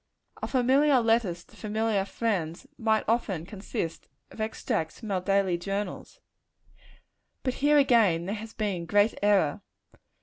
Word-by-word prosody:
Our -, -, -2 dB
familiar 265 Hz, +2 st, +4 dB
letters 225 Hz, -7 st, +1 dB
to -, -, -21 dB
familiar 215 Hz, -2 st, -1 dB
friends, 195 Hz, -3 st, -2 dB
might 220 Hz, -2 st, +2 dB
often 200 Hz, -8 st, 0 dB
consist 190 Hz, -4 st, -5 dB, 0.2 s
of 220 Hz, -, -8 dB
extracts 215 Hz, -6 st, -2 dB
from 220 Hz, -4 st, -6 dB
our 185 Hz, -2 st, 0 dB
daily 195 Hz, -2 st, +1 dB
journals. 200 Hz, +3 st, -4 dB, 1.2 s
But 255 Hz, -, 0 dB
here, 295 Hz, +1 st, +5 dB
again, 220 Hz, -, +4 dB
there 195 Hz, -, -2 dB
has 220 Hz, +1 st, -7 dB
been 190 Hz, -6 st, -2 dB
great 205 Hz, +5 st, +3 dB
error. 200 Hz, -5 st, +2 dB
210 Hz, 135 wpm, -28 LUFS, 185-230 Hz, 1.2 s, here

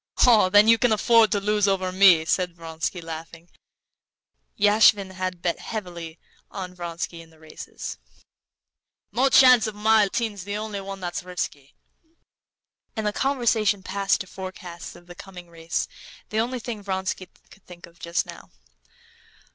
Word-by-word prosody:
"Oh, 220 Hz, -6 st, +5 dB
then 205 Hz, +2 st, +6 dB
you 230 Hz, 0 st, +6 dB
can 245 Hz, -3 st, +2 dB
afford 225 Hz, +1 st, +4 dB
to 205 Hz, -, +1 dB
lose 210 Hz, 0 st, +1 dB
over 190 Hz, -1 st, 0 dB
me," 185 Hz, -4 st, +6 dB
said 180 Hz, 0 st, 0 dB
Vronsky, 165 Hz, +1 st, -5 dB
laughing. 165 Hz, +1 st, -9 dB, 1.1 s
(Yashvin 205 Hz, -1 st, +4 dB
had 185 Hz, -1 st, -5 dB
bet 170 Hz, -, -1 dB
heavily 175 Hz, -6 st, -7 dB, 0.3 s
on 185 Hz, -2 st, -7 dB
Vronsky 170 Hz, -1 st, -6 dB
in 165 Hz, -, -16 dB
the 160 Hz, -, -22 dB
races.) 155 Hz, -, -9 dB, 1.1 s
"No 255 Hz, +6 st, +2 dB
chance 250 Hz, -4 st, +6 dB
of 215 Hz, -, -6 dB
my 215 Hz, 0 st, +4 dB
losing. 225 Hz, +3 st, -2 dB
Mahotin's 200 Hz, -3 st, -9 dB
the 205 Hz, +2 st, -4 dB
only 210 Hz, -2 st, -5 dB
one 195 Hz, 0 st, -8 dB
that's 175 Hz, -1 st, -4 dB
risky." 160 Hz, -6 st, -6 dB, 1.2 s
And 220 Hz, -2 st, -3 dB
the 210 Hz, -, 0 dB
conversation 225 Hz, -7 st, +1 dB
passed 195 Hz, +1 st, 0 dB
to -, -, -6 dB
forecasts 185 Hz, -2 st, -9 dB
of 175 Hz, -, -16 dB
the 175 Hz, -, -11 dB
coming 180 Hz, -2 st, -12 dB
race, 165 Hz, 0 st, -3 dB, 0.4 s
the 215 Hz, -, -1 dB
only 245 Hz, +3 st, -1 dB
thing 230 Hz, -3 st, -6 dB
Vronsky 190 Hz, -1 st, -4 dB, 0.2 s
could 195 Hz, -, -20 dB
think 175 Hz, -1 st, -12 dB
of 170 Hz, 0 st, -21 dB
just 170 Hz, 0 st, -1 dB
now. -, -, -12 dB
190 Hz, 155 wpm, -24 LUFS, 175-215 Hz, 1.2 s, then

